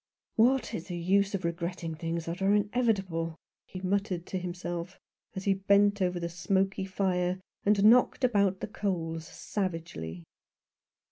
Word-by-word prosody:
"What 255 +4 +3
is 165 - -4
the 175 - -4
use 195 +3 +2
of 185 -3 -3
regretting 170 0 -3
things 165 +1 -3
that 170 +3 -5
are 195 +2 +4
inevitable? 200 -7 0 0.2
" - - -65
he 185 - -6
muttered 190 -2 -1
to 185 - -3
himself, 175 0 -5 0.4
as 190 - -4
he 195 - +3
bent 200 +1 +3
over 180 -1 +1
the 170 - -2
smoky 190 +2 0
fire, 185 -1 0 0.3
and 205 0 +4
knocked 245 +4 +5
about 200 -6 +2
the - - -2
coals 165 -6 -3
savagely. 165 - -4
185 Hz, 150 wpm, -29 LUFS, 170-200 Hz, 0.4 s, knocked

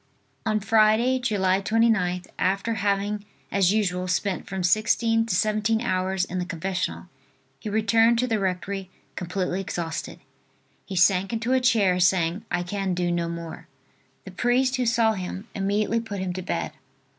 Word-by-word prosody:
On 215 -1 +2
Friday, 220 +4 +3
July 195 -6 +1
29th, 205 -5 +1
after 195 +5 0
having 205 0 -1 0.3
as 195 -2 +3
usual 185 -4 0
spent 185 +1 -1
from 190 -1 -4
sixteen 225 +4 +2
to 210 - 0
seventeen 215 +2 +1
hours 185 -3 0
in 185 0 -4
the 180 - -2
confessional, 180 +2 -3 0.5
he 215 - -5
returned 225 +2 +3
to 250 - +2
the 225 -3 0
rectory 190 0 -3 0.3
completely 180 +1 -2
exhausted. 170 -3 -5 0.7
He 195 - -5
sank 185 +2 +3
into 230 +3 0
a 260 - +4
chair 210 -8 +3
saying: 180 +1 +2
"I 180 0 -1
can 190 0 -2
do 175 0 0
no 170 -1 -1
more." 165 -1 -7 0.6
The 190 - -8
priest 250 +7 +1
who 250 -1 0
saw 230 -1 +3
him, 190 +2 -6
immediately 205 +3 0
put 220 -3 -6
him 185 -1 -2
to 185 - -4
bed. 180 - -3
195 Hz, 155 wpm, -25 LUFS, 180-225 Hz, 0.7 s, a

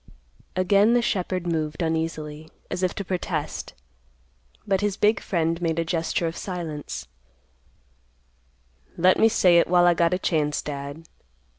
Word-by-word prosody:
Again 200 +5 +4
the 245 - +4
shepherd 185 -4 -1
moved 155 -2 -2
uneasily, 160 -1 -3 0.2
as - - -2
if 185 -1 0
to 200 - -4
protest, 175 -4 -3 0.9
but 195 -1 +1
his 205 -1 -1
big 210 +2 +3
friend 165 -1 -1
made 165 -1 0
a 165 - 0
gesture 165 +1 -1
of 165 0 -3
silence; 165 -6 -5 1.9
"Let 185 +2 +4
me 225 - +6
say 180 -6 +5
it - - +2
while 175 0 +4
I 175 - +6
got 170 +1 +2
a - - -1
chance, 150 -5 0
Dad." 140 +2 -6
170 Hz, 145 wpm, -24 LUFS, 160-185 Hz, 1.9 s, me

